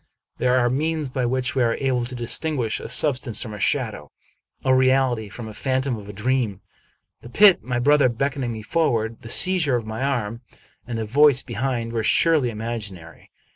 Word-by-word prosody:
There 125 0 +2
are 120 -1 +2
means 150 +3 -1
by 125 -1 -2
which 130 +1 -1
we 130 - 0
are 115 -1 +2
able 130 -3 -1
to 125 - -7
distinguish 120 0 0
a - - -8
sub 145 -4 +1
stance 120 -5 +1
from 110 -4 -8
a 105 - -8
shadow, - - -1 0.5
a 130 - +4
reality 130 -4 +2
from 115 +3 -9
the 110 - -8
phantom 130 +2 -1
of 105 -2 -10
a - - -5
dream. 110 -2 -1 0.6
The 120 - -11
pit, 195 - +6
my 125 -1 -3
brother 140 +1 +4
beckoning 130 +1 -2
me 110 -1 -7
forward, 115 -6 -1
the 115 - -10
seizure 175 -4 +2
of 115 -2 -2
my 110 +2 -6
arm, 120 -5 -2 0.5
and 120 -2 -4
tiie 110 - -3
voice 140 +3 +4
behind, 120 -1 -3
were 115 - -1
surely 150 +3 +3
imag 110 -1 -5
inary. 85 -3 -14
125 Hz, 195 wpm, -22 LUFS, 115-135 Hz, 0.6 s, pit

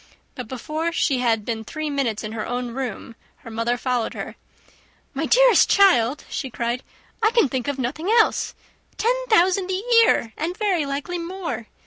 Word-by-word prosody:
But 250 -3 -7
before 305 +7 -3
she 280 -5 +1
had 225 -4 +1
been 225 -2 -3
three 310 +7 -5
minutes 255 -7 -1
in 215 - -5
her 220 -1 -4
own 245 0 -3
room, 245 -3 -5 0.3
her 230 - -8
mother 230 +2 -1
followed 245 -2 -1
her. - - -6 0.8
"My - - -2
dearest - - +5
child," 295 - +4
she 265 - -4
cried, 235 +1 -2 0.4
"I 435 - +4
can 465 -8 +3
think 255 -1 -3
of 285 -1 -2
nothing 285 +8 -3
else. 450 0 +2 0.4
Ten 465 +3 +2 0.2
thousand 375 -2 +3
a 375 +2 -2 0.2
year, 230 - +2
and 340 +4 -3
very 370 -9 0
likely 285 +6 -3
more! 340 - -5
275 Hz, 170 wpm, -22 LUFS, 235-360 Hz, 0.8 s, dearest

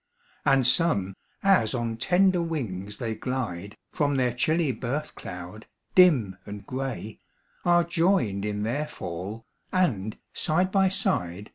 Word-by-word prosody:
And 135 -3 +4
some, 125 - +3 0.3
as 135 - +4
on 115 -2 -2
tender 180 +6 +3
wings 105 - -4
they 115 -1 -2
glide, 105 -6 -4
From 145 -1 +1
their 125 -2 +1
chilly 155 +4 +1
birth 135 +5 -3
cloud, 90 +4 -9 0.3
dim 135 - +5
and 105 0 -8
gray, 130 -5 -5 0.5
Are 175 0 +5
joined 170 - +1
in 105 0 -2
their 140 +8 -1
fall, 95 - -6 0.3
and, 110 - 0 0.2
side 180 +4 +1
by 195 -1 +4
side. 95 - -1
125 Hz, 130 wpm, -26 LUFS, 105-165 Hz, 0.5 s, dim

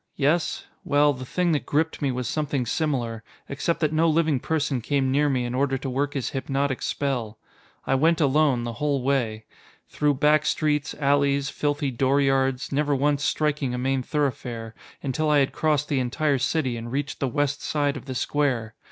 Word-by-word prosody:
Yes? 155 +4 0 0.2
Well, 145 0 +3
the 130 -1 -8
thing 180 +3 +1
that 150 - -1
gripped 160 +3 0
me 140 -2 +1
was 125 -1 -3
something 145 -3 -1
similar 120 -5 -2 0.2
except 155 +5 -2
that 155 -1 +1
no 165 +1 +3
living 155 -3 +2
person 145 -3 -1
came 135 +2 0
near 145 +2 +3
me 130 -3 0
in 120 - -3
order 135 +1 +1
to 135 +1 -5
work 140 +3 -1
his 135 - -2
hypnotic 135 0 -1
spell. 120 -6 -2 0.5
I - - +1
went 160 +5 +3
alone, 140 -4 +3
the 120 0 -4
whole 140 -3 0
way. 115 -5 0 0.4
Through 150 -1 +1
back 150 +2 +3
streets, 150 -2 0
alleys, 140 -1 +1
filthy 145 -1 -1
dooryards 135 0 +1
never 145 0 +1
once 145 +1 +1
striking 145 -3 0
a - - -3
main 135 +1 0
thoroughfare 125 -5 -3 0.3
until 150 +3 0
I 150 - +4
had 135 -2 +2
crossed 150 -2 +1
the 140 - 0
entire 140 +3 0
city 130 -2 0
and 115 +1 -7
reached 140 +2 -3
the 135 - 0
west 145 +3 -1
side 145 -1 0
of - - -8
the 130 -2 -5
square. 125 -5 0
140 Hz, 185 wpm, -25 LUFS, 130-150 Hz, 0.5 s, I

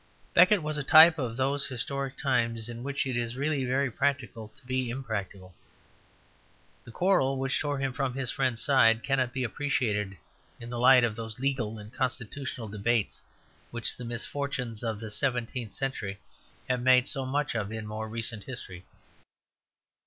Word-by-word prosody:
Becket 185 0 +6
was 150 0 0
a - - -2
type 160 +3 +8
of 120 -3 -3
those 140 +2 +1
historic 135 +1 -4
times 115 -5 0
in 120 0 -7
which 140 +2 -2
it 130 -2 -2
is 120 0 -2
really 140 0 -1
very 130 +1 0
practical 130 -4 -1
to - - -20
be 130 -1 -1
impracticable. 100 -7 -5 1.3
The - - -11
quarrel 135 -4 +2
which 135 0 -1
tore 145 -1 -1
him 135 -1 -2
from 130 -1 -2
his 135 -2 -2
friend's 130 -4 -1
side 115 -5 +4
cannot 130 -3 +1
be 130 +1 -2
appreciated 110 -6 -1 0.4
in 120 0 -8
the 120 - -4
light 125 0 +7
of 115 -3 0
those 110 0 -5
legal 130 -5 -1
and 105 +2 -11
constitutional 125 -1 -3
debates 105 +1 -1 0.5
which 120 -2 -2
the 125 - -9
misfortunes 120 -1 -4
of 110 -3 -2
the 110 -1 -7
seventeenth 120 -1 -2
century 115 -8 -3 0.5
have 125 -1 0
made 125 +1 +5
so 135 -2 -1
much 140 +2 -1
of 110 -3 -3
in 110 -1 -5
more 110 +1 -5
recent 115 -1 -1
history. 95 -8 -7
125 Hz, 165 wpm, -28 LUFS, 115-135 Hz, 1.3 s, type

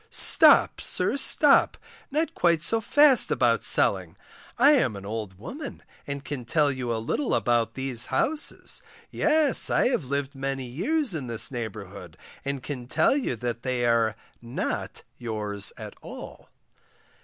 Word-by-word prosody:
Stop! - - +5
sir, - - 0
stop, 280 +1 +3 0.3
not 310 +4 -1
quite 170 -2 +1
so 225 +5 +1
fast 285 +3 +4
about - - +1
selling; - - +2 0.4
I 270 +5 +6
am 245 - +2
an 100 0 -9
old 105 -3 -6
woman 275 - -8 0.2
and 140 -1 -6
can 140 -4 -5
tell 145 +4 +1
you 130 -3 -4
a 115 - -1
little 115 - -1
about 115 -2 0
these 130 -3 -2
houses, 310 +1 -2 0.3
yes, 310 -3 +2
I - - +2
have 210 - -1
lived 140 +1 -3
many 135 -1 -4
years 220 - -1
in 145 -6 -4
this 115 +1 -1
neighbourhood, 100 -7 -7 0.3
and 140 -2 -4
can 125 -4 -6
tell 160 - +2
you 270 - -2
that 120 +1 -4
they 125 -1 -1
are 115 -2 +2 0.3
not 120 +1 -4 0.2
yours 105 -4 -1
at - - -9
all. - - -11
130 Hz, 150 wpm, -25 LUFS, -, 0.4 s, I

